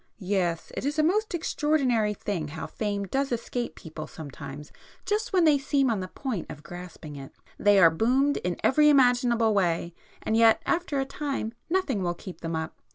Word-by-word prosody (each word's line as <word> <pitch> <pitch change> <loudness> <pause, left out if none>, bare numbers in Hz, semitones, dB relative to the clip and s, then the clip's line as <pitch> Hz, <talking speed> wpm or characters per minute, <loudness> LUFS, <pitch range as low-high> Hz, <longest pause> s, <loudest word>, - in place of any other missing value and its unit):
"Yes,—it 185 -4 -2
is 290 +3 -1
a 310 - +3
most 400 +4 +1
extraordinary 265 -10 +1
thing 185 -7 -3
how 160 +2 -6
fame 205 -2 -3
does 270 +7 -1
escape 240 +1 -3
people 155 -1 -8
sometimes 145 -1 -9 0.3
just 420 +1 -1
when 370 -3 +3
they 295 -3 +5
seem 275 -2 +1
on 215 - 0
the 185 - -4
point 245 - -4
of 150 - -9
grasping 175 -4 -9
it. 135 -1 -10 0.2
They 205 -1 +5
are 170 -4 +7
'boomed' 255 - +2
in 175 0 -2
every 300 +3 +5
imaginable 245 -5 +4
way, 175 -3 0 0.3
and 220 - 0
yet 225 -1 +6
after 335 -5 0
a 270 - 0
time 275 -5 -3 0.2
nothing 325 - 0
will 175 -1 -1
keep 185 +1 -10
them 165 0 -3
up. 160 +1 -5
220 Hz, 180 wpm, -27 LUFS, 175-275 Hz, 0.3 s, are